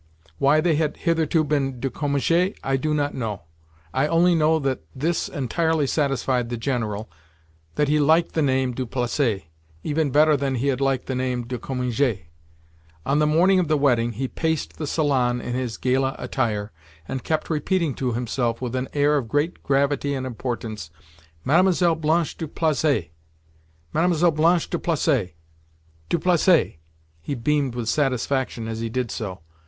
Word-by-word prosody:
Why 150 +3 +4
they 160 -2 +2
had 155 -1 -1
hitherto 165 -1 +1
been 140 -4 -1
"de 135 +1 -2
Cominges" 160 - +1
I 135 - +1
do 155 +3 -1
not 145 -1 0
know—I 80 - -5
only 170 +2 +4
know 160 -1 +3
that 135 -3 -1
this 160 +6 -1
entirely 160 +3 0
satisfied 135 -4 0
the 120 - -3
General, 110 -4 -2 0.7
that 150 - +2
he 150 +1 +2
liked 160 +3 +3
the 160 - +1
name 130 -2 +1
"du 125 +1 -4
Placet" 120 - -1 0.4
even 155 0 0
better 150 +3 +4
than 135 -1 -1
he 130 +3 0
had 135 0 -1
liked 135 -2 +1
the 130 - -3
name 125 -1 -2
"de 125 0 -5
Cominges." 125 -4 -1 0.8
On 140 +2 +2
the 150 - +3
morning 180 +5 +4
of 180 - +1
the 155 0 +2
wedding, 120 -4 +2
he 130 +5 -3
paced 160 +3 -2
the 155 - -3
salon 130 -6 +1
in 120 - -5
his 125 -3 -3
gala 130 +1 0
attire 105 -5 -2 0.4
and 130 - -4
kept 155 +1 -1
repeating 160 0 0
to 125 -2 -2
himself 120 0 -1
with 125 -1 -4
an 130 +1 -2
air 145 +1 +3
of 130 -5 -2
great 145 +7 -1
gravity 140 +1 +1
and 130 -1 -3
importance: 115 -7 -5 0.6
"Mlle. 175 +2 +4
Blanche 160 +1 0
du 160 - -4
Placet! 150 - 0 0.8
Mlle. 170 0 +3
Blanche 165 +2 +2
du - - -2
Placet, 140 - 0 0.7
du - - +2
Placet!" 175 - +3 0.4
He 140 - -4
beamed 135 +1 0
with 120 -2 -3
satisfaction 130 -3 0
as 115 0 -4
he 115 0 -3
did 125 0 -2
so. 95 -6 -5
135 Hz, 165 wpm, -23 LUFS, 125-155 Hz, 0.8 s, Why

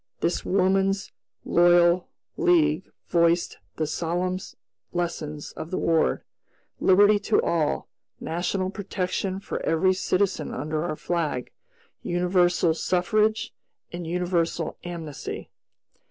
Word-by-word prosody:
This 170 - 0
Woman's 195 +1 +1 0.3
Loyal 175 0 +4 0.3
League 160 -1 +2 0.2
voiced 170 0 +2 0.2
the 155 - -1
solemn 175 +4 -1 0.5
lessons 160 -4 -3
of 160 - -7
the 185 - -2
War: 160 - +1 0.5
Liberty 205 +2 +5
to 215 +1 +2
all; 160 -3 0 0.3
national 180 +3 -2
protection 190 -1 -3
for - - -5
every 185 +4 +3
citizen 185 -3 0
under 155 +3 -2
our 175 - -2
flag; 155 -7 -2 0.5
universal 175 -1 +2
suffrage, 215 +6 +1 0.4
and 175 -1 -6
universal 170 -2 -1
amnesty. 165 -5 -6
175 Hz, 100 wpm, -25 LUFS, 165-185 Hz, 0.5 s, Liberty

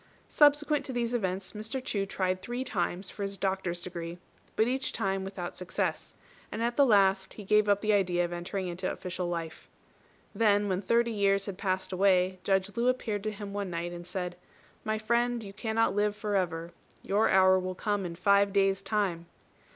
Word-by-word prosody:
Subsequent 295 0 +4
to - - -4
these 240 -1 -1
events 190 -4 -1
Mr. 220 +4 -4
Chu 205 -6 -2
tried 185 -1 -1
three 240 +5 -3
times 185 -4 -2
for - - -9
his 195 0 -2
doctor's 190 -3 -2
degree, 170 -1 -6 0.4
but 220 - +3
each 265 +2 0
time 195 0 -1
without 190 -2 -6
success, 180 - -3 0.4
and 225 - -3
at 240 +3 -1
last 195 -7 +4
he 210 - -8
gave 210 +1 +3
up 205 0 +3
the 215 0 +2
idea 180 -3 +2
of 175 - -5
entering 180 +2 -3
into 180 +2 -3
official 180 0 -4
life. 165 -2 -5 0.6
Then 205 -2 +3
when 190 -1 0
thirty 235 +3 +2
years 200 -2 +2
had 195 -2 -6
passed 190 -2 -1
away, 185 -1 +3
Judge 195 0 +1
Lu 235 +1 +1
appeared 225 -5 0
to 215 - 0
him 205 -1 -7
one 200 -2 -3
night, 170 0 -3
and 175 0 -8
said, 180 -1 -4 0.5
"My 215 0 -1
friend, 235 +2 0
you 195 -1 -9
cannot 225 0 0
live 205 0 +1
for 210 -1 -2
ever. 170 -3 -1 0.3
Your 205 +3 +2
hour 185 0 +5
will 185 0 -4
come 205 +1 -1
in 170 -2 -5
five 200 +3 +3
days' 195 -1 +2
time." 190 -6 -1
195 Hz, 190 wpm, -29 LUFS, 185-215 Hz, 0.6 s, hour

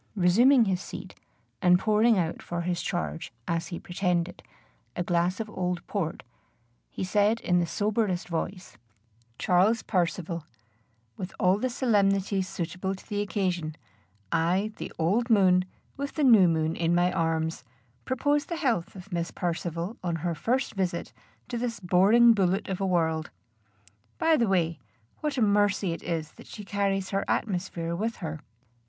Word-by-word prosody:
Resuming 230 +7 +5
his 190 -2 0
seat, - - -8 0.5
and 180 -1 +6
pouring 215 +3 +3
out 170 -2 -1
for 175 0 -4
his 175 0 -1
charge, 75 - -3 0.2
as 165 0 -1
he 170 - -5
pretended, 175 -1 -1 0.5
a 175 - -1
glass 175 +1 0
of 225 - -3
old 180 -3 -3
port, 175 -6 -3 0.7
he - - -5
said 205 +4 +2
in 180 0 +2
the 170 - 0
soberest 205 -2 0
voice: 180 +2 -5 0.6
"Charles 195 +6 +3
Percivale, 170 -3 -1 0.7
with 185 - -6
all 185 +2 +3
the 255 - 0
solemnity 200 -5 +2
suitable 185 +1 -3
to 190 - -16
the 205 -2 -1
occasion, 180 -6 -2 0.6
I, 180 +6 +1
the - - -6
old 210 +10 +1
moon, 185 -4 +5 0.3
with 280 +1 -4
the 305 - 0
new 220 -9 +7
moon 160 -1 +1
in 170 0 +1
my 175 +1 +3
arms, 160 0 -1 0.4
propose 290 +3 +1
the 340 - -3
health 245 - -1
of 190 +1 -11
Miss 170 0 -1
Percivale 170 +3 -3
on 170 -2 -1
her 170 - +1
first 240 - -1
visit 185 -4 -2 0.3
to 240 -1 -3
this 235 -1 -3
boring 205 +6 +5
bullet 190 -2 +1
of 190 0 -3
a 195 - +1
world. 160 -3 0 0.9
By 325 0 +4
the 235 -6 +2
way, 170 -5 +1 0.4
what 300 -2 -2
a 240 - +3
mercy 205 -2 +2
it - - -7
is 165 -2 -3
that - - -15
she 210 - -9
carries 195 -1 -1
her 195 0 0
atmosphere 175 -4 -2
with 225 +5 -2
her!" 160 -4 -5
185 Hz, 160 wpm, -27 LUFS, 170-210 Hz, 0.9 s, new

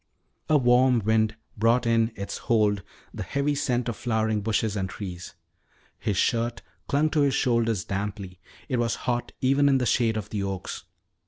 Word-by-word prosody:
A 155 - +5
warm 125 -1 +4
wind 110 0 +2 0.2
brought 115 +3 +2
in 115 0 +2
its 100 0 -5
hold 105 -4 +3 0.3
the - - -6
heavy 140 +1 0
scent 125 -4 0
of 120 - -2
flowering 110 -3 0
bushes 110 0 0
and 95 -2 -2
trees. 90 -4 -7 0.6
His 100 - -1
shirt 115 +1 0 0.2
clung 150 +2 +2
to 155 - +2
his 140 -2 +2
shoulders 115 -5 +1
damply. 100 -2 -4 0.3
It 130 - -1
was 115 -3 0
hot 120 -1 -1
even 140 +2 +4
in 135 - +4
the 125 - 0
shade 115 -2 +2
of 105 -1 -5
the 105 - -2
oaks. 95 -1 -5
115 Hz, 170 wpm, -26 LUFS, 105-125 Hz, 0.6 s, A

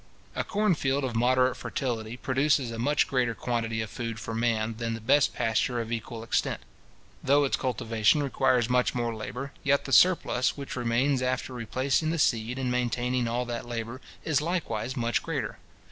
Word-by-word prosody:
A - - 0
corn 210 -2 +1
field 140 -2 0
of 125 -3 -2
moderate 130 +2 +3
fertility 115 -3 -3
produces 135 -1 +1
a 115 - -6
much 145 +5 +2
greater 125 -3 0
quantity 115 -2 -2
of 110 - -4
food 115 -2 -4
for 115 - -5
man, 115 -1 0
than 115 -1 -2
the - - -6
best 125 +5 +3
pasture 120 +2 0
of 115 0 -4
equal 115 0 -4
extent. 115 - -1 0.6
Though 145 +2 +4
its 140 - +1
cultivation 115 +2 +1
requires 130 -3 +2
much 125 0 +2
more 120 -1 -1
labour, 125 +5 -6
yet 140 0 +2
the 135 - -3
surplus 150 -8 +4
which 140 -1 -6
remains 125 +3 +1
after 130 0 -1
replacing 130 +6 0
the 165 - 0
seed 120 -4 +1
and 130 -2 -1
maintaining 125 0 0
all 120 +2 -1
that 120 0 -5
labour, 120 +2 -5 0.2
is 150 -3 +2
likewise 135 -8 -2
much 120 -1 +1
greater. - - -4
125 Hz, 175 wpm, -28 LUFS, 115-135 Hz, 0.6 s, Though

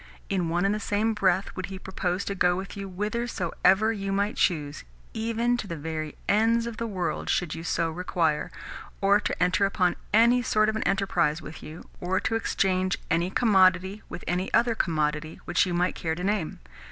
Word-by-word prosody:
In 185 -4 0
one 175 +3 +1
and 200 - +2
the 210 - -2
same 215 +2 0
breath 195 -2 +1
would 185 - -4
he 190 0 -7
propose 190 0 -3
to 200 - -2
go 180 -2 +2
with 195 +3 -6
you 200 -1 -6
whithersoever 210 0 +1
you 195 -2 -3
might 200 +2 0
choose 150 -4 0 0.3
(even 230 +2 0
to 220 - -5
the 170 - -4
very 155 0 -5
ends 225 +3 +3
of 235 -2 -5
the 230 - -2
world 185 -5 -3
should 175 -3 0
you 165 - -6
so 165 0 0
require) 170 -3 0 0.5
or 200 +1 +4
to - - -3
enter 180 +3 +2
upon 190 -2 +2 0.2
any 235 +3 +5
sort 215 -2 +2
of 220 - -2
an 220 - -1
enterprise 175 -5 +1
with 155 -1 -10
you, 155 +3 -10
or 185 +1 0
to - - -2
exchange 185 -4 0
any 170 +2 +2
commodity 190 -2 +3
for - - -5
any 180 +2 -1
other 235 0 +3
commodity 155 -5 -1
which 175 +1 +2
you 180 - -2
might 180 +1 +1
care 160 -1 -2
to 180 - -6
name. 200 -4 -1
190 Hz, 195 wpm, -26 LUFS, 175-210 Hz, 0.5 s, any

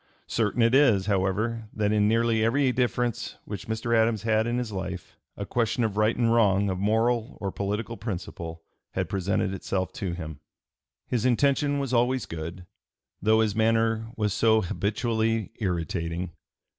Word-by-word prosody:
Certain 115 +1 +1
it 115 +1 +3
is, 120 -9 +5
however, 105 +3 0
that 105 -1 0
in 105 -1 +3
nearly 115 0 +2
every 130 +3 +3
difference 120 -1 -1
which 105 - -6
Mr. 115 +1 0
Adams 110 -1 +2
had 110 0 +2
in 120 +1 0
his 125 -3 -3
life 95 -2 -5 0.2
a 100 - -4
question 115 +2 0
of 110 -3 -1
right 110 +2 +2
and 115 -1 +3
wrong, 100 -3 +3
of 90 - -3
moral 115 +4 +1
or 100 -1 -3
political 105 +4 -3
principle, 85 -6 -6 0.3
had - - -1
presented 95 0 -1
itself 95 -1 -2
to 95 -4 -3
him. 80 -4 -7 0.7
His 120 -3 -1
intention 140 +3 +2
was 135 -2 -2
always 125 +1 +2
good, 85 +3 -7 0.6
though 110 +2 +4
his 110 -2 +1
manner 110 0 +2
was 105 -2 0
so 110 0 +4
habitually 110 +3 -1
irritating. 85 -2 -2
110 Hz, 155 wpm, -26 LUFS, 95-115 Hz, 0.7 s, is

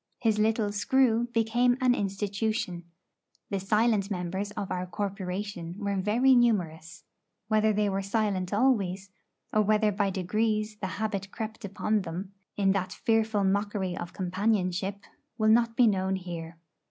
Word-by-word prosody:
His 220 -3 +1
little 215 -1 +2
'screw' 240 +2 +2
became 240 +2 +2
an 255 -2 +4
institution. 200 -3 -2 0.7
The 200 - 0
silent 210 +1 +2
members 190 +1 -3
of 200 -2 -5
our 180 0 -2
corporation 190 -2 -4
were 200 -1 -2
very 220 +8 +3
numerous; 175 -10 +1 0.5
whether 215 0 +3
they 210 0 +1
were 195 0 -1
silent 195 -2 -1
always, 200 -5 +1 0.4
or 215 - +4
whether 215 0 +3
by 200 0 0
degrees 215 +3 -1
the 200 - -3
habit 200 -2 -2
crept 220 +2 -6
upon 205 +2 0
them 185 +2 -6 0.3
in 195 -1 +3
that 185 -1 -1
fearful 220 -1 +1
mockery 195 -1 0
of 175 -2 -6
companionship, 190 0 -1 0.3
will 215 -1 +3
not 230 +1 +4
be 245 - +5
known 190 -3 +1
here. 170 -3 -7
205 Hz, 140 wpm, -28 LUFS, 190-220 Hz, 0.7 s, be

